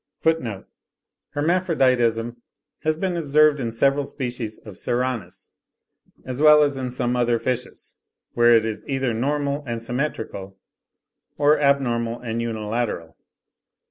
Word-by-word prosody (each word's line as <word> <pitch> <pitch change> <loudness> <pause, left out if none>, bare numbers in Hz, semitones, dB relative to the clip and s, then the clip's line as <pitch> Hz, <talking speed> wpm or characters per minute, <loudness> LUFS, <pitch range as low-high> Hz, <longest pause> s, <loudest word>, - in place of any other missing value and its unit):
(28. 125 -12 0 0.7
Hermaphroditism 130 -8 +1 0.4
has 155 0 0
been 185 +1 -1
observed 150 -2 +3
in 115 -3 -2
several 140 +5 +2
species 125 -5 -5
of 105 - -9
Serranus, 120 -6 -3 0.7
as 130 +2 -4
well 150 -1 +8
as 145 -1 +1
in 130 -1 -3
some 125 0 -1
other 120 -1 +2
fishes, 125 +1 -4 0.4
where 120 -1 +6
it 110 - 0
is 110 -1 -4
either 135 -3 0
normal 140 +4 -1
and 115 -1 -4
symmetrical, 115 -7 -4 0.8
or 145 +1 +4
abnormal 120 -5 +1
and 115 -1 -3
unilateral. 110 -6 -3
125 Hz, 120 wpm, -23 LUFS, 115-145 Hz, 0.8 s, well